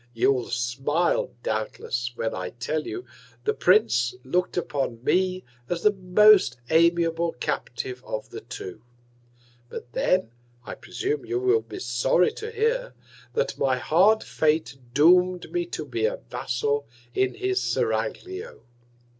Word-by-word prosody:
You'll 125 +1 +2
smile, 135 +8 0
doubtless, 120 +2 -3
when 115 -1 -2
I 90 -1 -4
tell 140 +8 -3
you 375 - -5 0.4
the 435 - +1
Prince 125 - +3
look'd 180 +9 -1
upon 135 -8 -2
me 185 +4 +1 0.3
as 170 -1 -2
the 210 - +6
most 190 - +5
amiable 170 0 +3
Captive 125 +1 -4
of 110 - -5
the - - -7
two; 95 +4 -8 0.9
but 120 - -8
then, 185 -11 +1 0.3
I - - -6
presume 145 +1 -3
you 120 - -2
will 125 -3 +3
be 115 - -9
sorry 125 +8 +2
to 440 - -7
hear, 465 +3 -1 0.4
that 475 +2 -1
my 130 -2 +2
hard 190 - +4
Fate 155 -2 0 0.2
doom'd 180 +6 +4
me 350 -1 -1
to - - -5
be 450 - 0
a - - -3
Vassal 140 +2 -1 0.3
in 130 0 +1
his 380 0 0
Seraglio. 380 +6 -2
155 Hz, 135 wpm, -25 LUFS, 125-190 Hz, 0.9 s, the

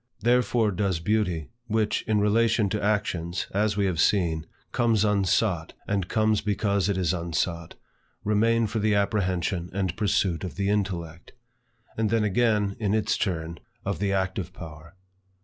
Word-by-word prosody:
Therefore 120 -2 +2
does 95 -2 0
beauty, 90 -4 0 0.2
which, 110 -1 +1
in 110 -2 +2
relation 110 0 +2
to 105 - -2
actions, 95 -5 -1
as 105 +1 0
we 100 - +2
have 90 -4 -1
seen, 80 -4 +2 0.2
comes 115 -3 +2
unsought, 95 -3 +1
and 100 -3 -1
comes 110 -1 +2
because 100 -2 0
it 100 - 0
is 90 -2 +1
unsought, 85 -1 -2 0.5
remain 115 +2 +2
for 110 +1 -2
the 105 0 +2
apprehension 95 -3 0
and 95 -2 -1
pursuit 95 -4 0
of 90 - -5
the 100 0 -1
intellect; 90 -5 -3 0.7
and 110 -1 +2
then 115 0 +2
again, 105 -1 +1
in 105 -2 +1
its 110 0 +1
turn, 85 -4 -2 0.3
of - - -2
the 100 -1 0
active 95 -1 -2
power. 80 -1 -11
100 Hz, 150 wpm, -26 LUFS, 90-105 Hz, 0.7 s, Therefore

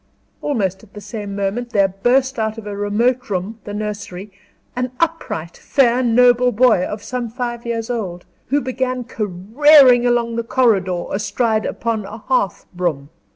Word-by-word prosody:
Almost 195 -9 -1
at 215 -3 -19
the - - -7
same 205 0 -6
moment 200 +5 -2
there 200 -4 +3
burst 245 +7 +1
out 220 0 -1
of 225 - -8
a 205 -1 -5
remote 230 +5 0
room 200 +4 -3
the 205 - -6
nursery 205 -2 -5 0.4
an 250 0 -2
upright, 320 - -2
fair, 255 -3 +2
noble 245 +1 +4
boy, 240 -5 +4
of 210 +2 -5
some 250 -2 -4
five 240 0 -5
years 230 -1 -2
old, 190 -8 -4 0.2
who 285 +2 +1
began 255 -1 -2
careering 245 - +4
along 240 -1 +2
on 230 - -5
the 235 - -1
corridor, 200 -8 +1
astride 215 +2 0
upon 225 -3 -2
a 205 +3 -8
hearth 230 -5 -1
broom. 165 -6 -2
225 Hz, 160 wpm, -19 LUFS, 200-250 Hz, 0.4 s, noble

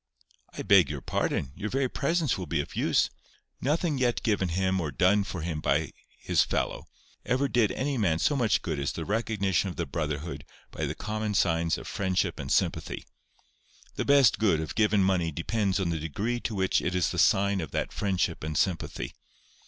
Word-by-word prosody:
"I - - -5
beg 100 -4 +5
your 70 -2 -4
pardon. 65 - -1
Your 110 - -4
very 135 +2 +1
presence 155 0 0
will 90 -2 -5
be 75 0 0
of 75 - -4
use. - - +2 0.5
Nothing 150 +1 0
yet 120 -2 +1
given 100 -5 +1
him 95 +2 0
or 80 - -2
done 95 +7 +3
for 90 -3 -5
him 80 -3 -3
by 75 +3 +1 0.3
his - - +3
fellow, - - -2 0.4
ever 130 +3 +1
did 120 -5 +2
any 135 -1 -1
man 85 -7 +2
so 145 - +1
much 115 -8 +2
good - - -2
as 70 +3 -1
the 80 - -5
recognition 100 -4 0
of 90 - -7
the - - -2
brotherhood 75 0 -4 0.3
by - - -3
the - - -4
common 110 -1 -3
signs 85 -3 +2
of - - -9
friendship 95 -2 -1
and - - -5
sympathy. - - 0 0.9
The - - -2
best 140 -3 +5
good 100 -8 +3
of 80 - -4
given 105 -2 +3
money 90 -3 +1
depends 95 +5 -1
on 90 -3 0
the 80 - -2
degree 100 +11 -2
to 115 - -4
which 95 -1 +1
it 90 - -2
is 90 - +1
the - - -2
sign 100 0 +3
of 80 - -5
that - - -3
friendship 95 -5 -1
and 75 0 -3
sympathy. 90 -5 -1
95 Hz, 195 wpm, -28 LUFS, 85-110 Hz, 0.9 s, beg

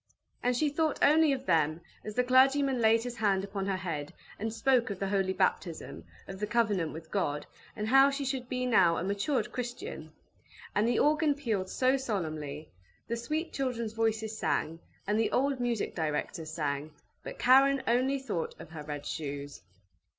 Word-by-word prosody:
And 245 0 +1
she 305 - +2
thought 310 +1 0
only 310 +1 +5
of 265 -1 -2
them 155 -2 +2 0.2
as 215 -1 -7
the 250 - +3
clergyman 265 +1 +4
laid 225 0 +4
his 245 -1 -6
hand 195 -3 +1
upon 195 -1 -4
her 195 -1 0
head, 165 -6 -4 0.3
and 220 +2 -2
spoke 250 +1 +2
of 200 - -4
the 195 +1 -2
holy 195 -1 +1
baptism, 175 - -2 0.2
of 190 0 -8
the 210 - -2
covenant 205 -8 +1
with 160 0 -10
God, 150 -7 -1 0.3
and 210 - -3
how 270 +3 +6
she 280 0 -3
should 260 -2 -3
be 255 -1 -1
now 180 -9 +4
a - - -2
matured 200 +8 -1
Christian; 250 - -6 0.6
and 210 +2 +2
the 240 - +2
organ 300 0 +3
pealed 220 -10 -2
so 260 +5 +2
solemnly; 155 - -4 0.4
the 235 - -1
sweet 305 +9 -3
children's 235 -5 -2
voices 220 -1 -1
sang, 165 -3 -1 0.3
and 210 +2 +1
the 225 - +1
old 275 0 +1
music 240 -3 -1
directors 155 0 -3
sang, 150 -1 -3 0.3
but - - -8
Karen 270 +2 +5
only 255 +4 +2
thought 260 -11 -4
of - - -11
her 160 -2 -7
red 145 -1 -6
shoes. 145 - -5
220 Hz, 180 wpm, -30 LUFS, 170-260 Hz, 0.6 s, how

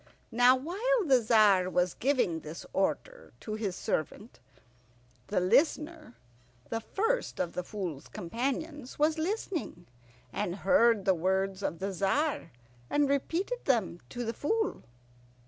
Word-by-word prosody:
Now, 245 +2 +6
while 400 - 0
the 260 -5 +5
Tzar 210 -5 +4
was 180 -1 +1
giving 245 - +1
this 155 +1 -8
order - - -2
to 215 - -5
his 210 -4 -2
servant, 200 - -3 0.9
the - - +1
Listener, 300 - +1 0.6
the 225 - 0
first 450 - -1
of 170 - -1
the - - -2
Fool's 180 -8 -5
companions, 270 - -4
was 310 +2 +2
listening, 335 - -3 0.5
and 185 -4 -2
heard 235 -7 +4
the 190 - +5
words 190 +2 0
of 170 - -2
the 195 +2 -3
Tzar 195 - 0 0.4
and 290 -1 +2
repeated 345 - -1
them 220 -10 +1
to 245 -1 -4
the 230 - -2
Fool. 435 - -1
235 Hz, 130 wpm, -30 LUFS, 190-305 Hz, 0.9 s, Now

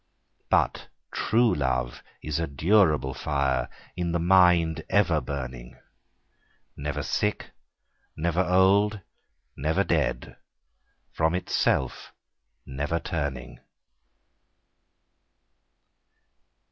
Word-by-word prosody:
But - - +1 0.3
true 115 +1 +2
love 65 -3 -2 0.2
is 75 0 -2
a 80 - -1
durable 75 -2 +2
fire, 70 -2 -1 0.3
In 85 -1 -2
the 85 - +1
mind 90 -2 +4
ever 85 -7 +2
burning, 65 -4 -7 1.0
Never 75 +1 -4
sick, 105 0 -2 0.6
never 85 +3 0
old, 100 +3 +3 0.5
never 75 +4 0
dead, - - -1 0.8
From 80 +2 +1
itself 70 -7 -1 0.5
never 75 +5 -2
turning. 70 -7 -4
80 Hz, 80 wpm, -26 LUFS, 70-90 Hz, 1.0 s, mind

